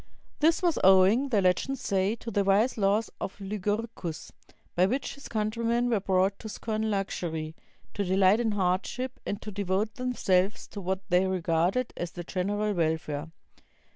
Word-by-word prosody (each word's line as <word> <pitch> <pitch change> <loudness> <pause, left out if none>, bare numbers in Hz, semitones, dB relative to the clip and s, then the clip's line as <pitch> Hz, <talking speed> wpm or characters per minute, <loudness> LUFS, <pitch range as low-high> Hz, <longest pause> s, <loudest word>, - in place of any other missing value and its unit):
This 325 +4 +3
was 345 -3 +2
owing, 195 +8 +5
the 210 -6 +2
legends 215 +9 +1
say, 195 +1 0
to 230 0 -7
the 205 -2 +2
wise 200 +6 +3
laws 205 +1 +1
of 195 - -5
Lycurgus, 205 -3 -3 0.4
by 180 +2 +3
which 260 +6 -2
his 280 - -11
countrymen 230 +2 0
were 220 - +3
brought 190 0 +1
to 220 - -7
scorn 220 0 -2
luxury, 165 -6 -3 0.4
to 205 - -1
delight 190 +2 +4
in 225 -3 +1
hardship, 205 +7 -1
and 205 - -2
to 215 - -6
devote 200 +2 -1
themselves 205 -6 +1
to 205 - -7
what 190 +1 -3
they 180 +1 +3
regarded 180 +6 0
as 175 0 -5
the 175 - -6
general 205 +4 -1
welfare. 160 -3 -1
200 Hz, 160 wpm, -28 LUFS, 185-225 Hz, 0.4 s, owing